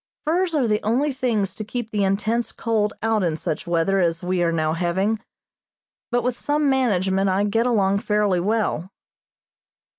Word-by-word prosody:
Furs 340 +2 +1
are 270 -5 +2
the 210 -1 +1
only 265 +7 +1
things 225 -7 -1
to 215 - -6
keep 225 +1 -5
the 205 -2 0
intense 215 +4 0
cold 215 -2 -1
out 225 -1 +2
in 165 -4 0
such 155 0 -4
weather 175 +3 +1
as 165 -2 0
we 180 0 0
are 170 -1 +2
now 155 -1 0
having, 190 +6 0 0.9
but 245 -1 0
with 245 0 -2
some 295 0 0
management 195 -7 +1
I 190 +2 +1
get 225 +4 +1
along 200 -4 +2
fairly 210 -3 +1
well. 195 -3 -1
210 Hz, 170 wpm, -23 LUFS, 185-235 Hz, 0.9 s, are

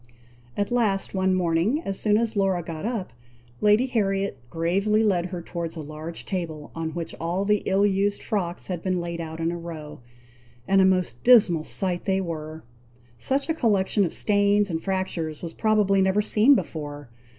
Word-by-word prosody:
At 205 +3 -1
last, 215 -5 +1
one 190 -1 +2
morning, 180 - +1
as 195 - -3
soon 210 -1 +3
as 225 0 -1
Laura 190 -3 +1
got 160 +2 -6
up, 220 - -4 0.5
Lady 210 - +4
Harriet 195 - -1
gravely 195 +6 +1
led 180 -5 +1
her 180 -2 -6
towards 170 -1 -5
a 160 - -5
large 155 +2 -7
table 160 -6 -4
on 160 0 -4
which 170 -1 -4
all 175 +4 -1
the 210 0 +2
ill 195 +1 +3
used 200 0 0
frocks 180 -4 -2
had 180 -3 -3
been 185 -1 -1
laid 170 0 -4
out 160 0 -6
in 165 +1 0
a 175 - -4
row; 160 -3 -8 0.7
and 195 0 +4
a - - +5
most 180 -11 +1
dismal 200 -10 +6
sight 180 -2 -2
they 190 -1 +1
were! 160 -3 -5 0.6
Such 270 - -1
a 320 - +1
collection 205 -7 +2
of 170 - -1
stains 205 -1 +2
and 160 0 -2
fractures 180 -5 -3
was 165 -1 -5
probably 210 -3 +2
never 190 +2 +2
seen 220 +6 +5
before! 145 - -5
190 Hz, 180 wpm, -25 LUFS, 165-205 Hz, 0.7 s, dismal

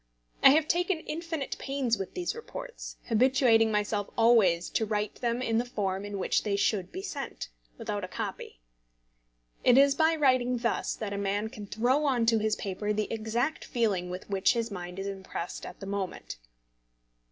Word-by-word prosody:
I - - +10
have 310 +2 +4
taken 350 0 +1
infinite 325 -3 -4
pains 270 -4 0
with 195 -3 -6
these 355 -1 -2
reports, - - -8
habituating 230 -1 +4
myself 210 -1 -1
always 210 -8 +4
to - - +1
write 210 -1 -2
them 240 0 0
in 225 -2 +1
the - - +1
form 200 -5 -2
in 205 -1 -5
which 190 - +1
they 205 -2 -1
should 200 -2 0
be 375 +2 -6
sent, 285 - -5 0.3
without - - -4
a - - -3
copy. - - -6 1.0
It 250 0 +6
is 280 0 +6
by 320 +3 +3
writing 255 -4 +3
thus 235 0 -1
that 210 -2 -4
a 200 - -3
man 200 +2 -1
can 210 -2 -9
throw 250 +8 +1
on 250 -5 +2
to 225 -1 +4
his 215 0 +1
paper 205 +2 -3
the 215 +1 -2
exact 230 +6 -1
feeling 205 -8 0
with 180 +1 -6
which 195 -1 +2
his 230 -2 -2
mind 180 -2 -6
is 195 - -4
impressed 190 -3 -5
at - - -10
the 195 - -7
moment. 195 - -4
225 Hz, 180 wpm, -29 LUFS, 200-265 Hz, 1.0 s, I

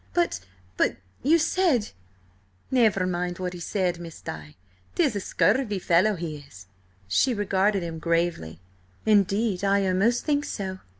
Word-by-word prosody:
"But–but–you 95 - -1
said—" 325 - +1 0.8
"Never 220 -7 +3
mind 175 -1 -2
what 180 -1 -4
he 175 - -8
said, 180 -1 -1
Miss 165 -2 -9
Di. 75 -1 -8 0.4
'Tis 290 -10 +2
a - - 0
scurvy 210 +2 +1
fellow 185 +4 +3
he 165 -3 -5
is." 95 -11 -14 0.4
She 245 - +2
regarded 200 -1 +1
him 165 -1 -5
gravely. 165 - -1 0.5
"Indeed, 205 -1 +2
I 200 0 +2
almost 200 +6 +1
think 290 -1 +1
so." 190 -7 -5
185 Hz, 130 wpm, -25 LUFS, 170-215 Hz, 0.8 s, Never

